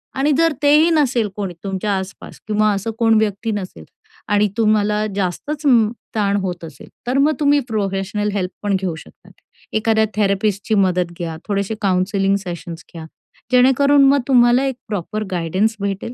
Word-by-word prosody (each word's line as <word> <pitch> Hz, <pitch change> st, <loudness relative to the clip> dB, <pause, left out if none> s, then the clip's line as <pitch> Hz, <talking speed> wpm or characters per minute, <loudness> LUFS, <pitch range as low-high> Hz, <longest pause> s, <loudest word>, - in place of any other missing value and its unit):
आणि 275 Hz, +3 st, +1 dB
जर 330 Hz, -1 st, +3 dB
तेही 300 Hz, +3 st, +5 dB
नसेल 265 Hz, -9 st, +1 dB
कोणी 195 Hz, -4 st, -4 dB
तुमच्या 195 Hz, 0 st, -2 dB
आस-पास 190 Hz, +1 st, -8 dB
किंवा 215 Hz, 0 st, +2 dB
असं 200 Hz, +3 st, -3 dB
कोण 225 Hz, -1 st, +4 dB
व्यक्ती 215 Hz, +1 st, -1 dB
नसेल 185 Hz, -, -6 dB, 0.4 s
आणि 205 Hz, 0 st, +2 dB
तुम्हाला 215 Hz, -1 st, +2 dB
जास्तच 205 Hz, -, -3 dB
उम्म, 230 Hz, -6 st, +4 dB, 0.2 s
ताण 200 Hz, -2 st, +1 dB
होत 180 Hz, -2 st, -4 dB
असेल, 150 Hz, -4 st, -13 dB, 0.2 s
तर 255 Hz, +2 st, 0 dB
मग 290 Hz, +3 st, +3 dB
तुम्ही 290 Hz, -1 st, +3 dB
प्रोफेशनल 205 Hz, 0 st, -1 dB
हेल्प 185 Hz, -2 st, -2 dB
पण 205 Hz, -1 st, +1 dB
घेऊ 180 Hz, -4 st, -2 dB
शकतात. 160 Hz, -, -15 dB, 0.4 s
एखाद्या 220 Hz, 0 st, +2 dB
थेरपिस्टची 205 Hz, +1 st, 0 dB
मदत 180 Hz, -3 st, +1 dB
घ्या, 165 Hz, -2 st, -4 dB
थोडेसे 200 Hz, +1 st, -1 dB
काउन्सिलिंग 195 Hz, 0 st, +1 dB
सेशन्स 170 Hz, -1 st, -7 dB
घ्या. 165 Hz, -2 st, -8 dB, 0.5 s
जेणेकरून 270 Hz, +3 st, +5 dB
मग 280 Hz, -, +4 dB
तुम्हाला 245 Hz, -1 st, +4 dB
एक 265 Hz, -2 st, -2 dB
प्रॉपर 210 Hz, +1 st, -3 dB
गाईडन्स 185 Hz, +6 st, 0 dB
भेटेल 200 Hz, +3 st, -4 dB
210 Hz, 155 wpm, -19 LUFS, 190-235 Hz, 0.5 s, तेही